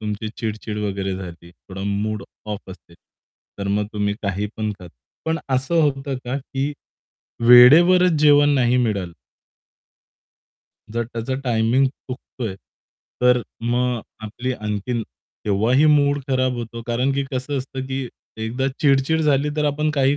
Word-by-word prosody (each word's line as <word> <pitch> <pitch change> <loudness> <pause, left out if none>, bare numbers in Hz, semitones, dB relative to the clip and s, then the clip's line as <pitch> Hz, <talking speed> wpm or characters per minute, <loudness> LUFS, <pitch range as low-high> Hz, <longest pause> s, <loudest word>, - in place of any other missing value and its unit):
तुमची 105 0 -4
चिड-चिड 110 -1 -4
वगैरे 100 -2 -2
झाली. 85 -2 -9
थोडा 95 +2 -10
मूड 105 +1 -2 0.2
ऑफ 105 -2 -6
असेल, 85 -2 -14 0.6
तर 100 0 -3
मग 105 +1 0
तुम्ही 105 -1 -1
काही 100 0 -1
पण 110 -1 -2
खा. 90 - -11 0.4
पण 160 0 0
असं 135 +5 +1
होतं 135 -2 -1
का 125 +2 -2
की 135 +1 -3 0.8
वेळेवरच 170 +10 +8
जेवण 145 -1 +6
नाही 125 -1 +3
मिळालं 100 -8 -1 1.8
जर 115 +2 -1
त्याचा 115 +2 -4
टायमिंग 120 +2 +2
चुकतोय, 125 -4 -7 0.7
तर 125 0 +4 0.2
मग 120 +1 0 0.2
आपली 120 +4 -3
आणखीन 105 +1 -3 0.4
तेव्हाही 110 +8 +3
मूड 145 -1 +4
खराब 130 -1 +1
होतो, 115 0 -6
कारण 125 +3 +1
की 140 0 -1
कसं 130 +2 -2
असतं, 130 0 -6
की 135 -1 -3 0.3
एकदा 115 +4 -2
चिड-चिड 140 +2 +3
झाली 145 -2 +2
तर 150 - +1
आपण 150 +1 +1
काही 140 0 +3
125 Hz, 135 wpm, -21 LUFS, 105-135 Hz, 1.8 s, वेळेवरच